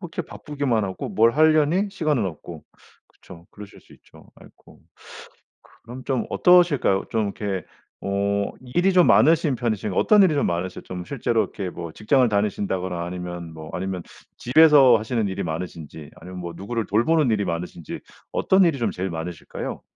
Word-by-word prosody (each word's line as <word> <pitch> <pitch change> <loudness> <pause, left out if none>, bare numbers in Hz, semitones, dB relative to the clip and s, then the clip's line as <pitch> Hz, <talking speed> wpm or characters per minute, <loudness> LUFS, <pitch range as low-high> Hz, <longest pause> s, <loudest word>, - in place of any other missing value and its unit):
그렇게 175 -3 -5
바쁘기만 140 -7 -2
하고 95 -1 -5
뭘 115 +1 +3
하려니 155 - +3
시간은 155 - 0
없고. 80 -1 -9 0.4
그쵸. 85 -1 -16
그러실 105 -1 -12
수 - - -21
있죠. - - -19
아이고. - - -19 1.0
그럼 125 +3 -10
좀 130 -3 -1
어떠실까요? 170 - +3
좀 110 -1 0
이렇게 95 -4 -4 0.4
어 100 +1 -1
일이 175 +10 +1
좀 180 -2 +5
많으신 160 -3 +4
편이신가 110 -5 -2
어떤 210 -2 +5
일이 180 - +3
좀 145 - +1
많으시 90 +2 -3
좀 90 -1 -7
실제로 120 -2 0
이렇게 95 -3 -4
뭐 85 -2 -7
직장을 125 +4 +2
다니신다거나 95 -4 -2
아니면 90 -1 -7
뭐 80 0 -10
아니면 95 -1 -4 0.3
집에서 140 -2 +6
하시는 110 0 -2
일이 95 - -4
많으신지 80 -3 -7
아니면 90 0 -10
뭐 85 -1 -6
누구를 110 +4 -4
돌보는 130 +7 +2
일이 105 -2 +1
많으신지 85 -1 -5 0.3
어떤 190 0 +3
일이 160 -4 +1
좀 120 - -1
제일 95 +1 -4
많으실까요? 85 0 -6
105 Hz, 375 characters per minute, -23 LUFS, 90-140 Hz, 1.0 s, 집에서